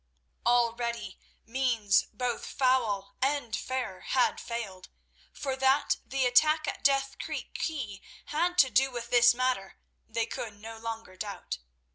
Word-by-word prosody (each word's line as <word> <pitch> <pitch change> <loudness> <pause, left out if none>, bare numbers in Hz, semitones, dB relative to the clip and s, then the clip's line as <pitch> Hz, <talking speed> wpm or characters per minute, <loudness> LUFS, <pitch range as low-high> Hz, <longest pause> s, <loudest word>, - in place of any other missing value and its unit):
Already 235 0 +1 0.3
means 230 -4 +2
both 250 -2 -2
foul 235 -7 +1
and 270 -4 0
fair 255 -8 -3
had 255 - +1
failed, 215 -6 -6 0.4
for 270 -2 -3
that 265 +2 +3
the 270 0 0
attack 305 +6 +4
at - - -4
Death 275 -1 +2
Creek - - -5
quay 240 - -3 0.2
had 345 +4 0
to 260 -6 +6
do 270 +1 +4
with 240 -1 -6
this 240 -1 +7
matter 255 -6 -1 0.3
they 230 0 0
could 210 -3 -6
no 225 +1 -8
longer 225 -4 -6
doubt. 195 - -5
245 Hz, 135 wpm, -29 LUFS, 225-265 Hz, 0.4 s, this